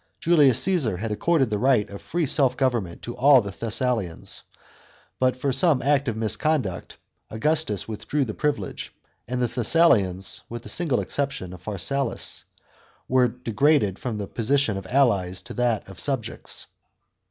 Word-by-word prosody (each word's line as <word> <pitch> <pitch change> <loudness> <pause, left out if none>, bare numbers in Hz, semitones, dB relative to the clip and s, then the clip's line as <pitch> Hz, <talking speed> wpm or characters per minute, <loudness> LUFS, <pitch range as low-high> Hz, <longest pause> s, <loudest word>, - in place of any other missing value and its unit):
* - - -47
Julius 150 -7 +4
Caesar 150 - +1
had 110 +3 -4
accorded 135 +2 +1
the 105 - 0
right 125 -4 +3
of 100 - -8
free 170 -1 -1
self 135 -3 +2
government 120 -10 -1
to 120 - -6
all 135 +1 +6
the 100 -4 -4
Thessalians, 110 -2 -2 0.8
but, 130 0 +2
for 135 +1 -1
some 140 +1 +4
act 140 0 +2
of 115 -2 -2
misconduct, 110 - -1 0.3
Augustus 150 - -1
with 110 -2 -7
drew 145 -2 +1
the 110 - -5
privilege; 130 -9 -3 0.4
and 125 +1 -1
the - - +2
Thessalians, 110 - +2
with 120 0 -7
the - - -8
single 165 -8 +1
exception 140 -11 -3
of 90 - -11
Pharsalus, 110 +7 -1 0.6
were 130 -1 +3
degraded 120 - +1
from 120 -4 -4
the 105 - -4
position 120 +1 0
of 95 -1 -6
allies 95 -8 +1
to - - -9
that 120 -3 0
of 95 -2 -12
3ubjects. 135 -6 -3
125 Hz, 160 wpm, -24 LUFS, 105-140 Hz, 0.8 s, all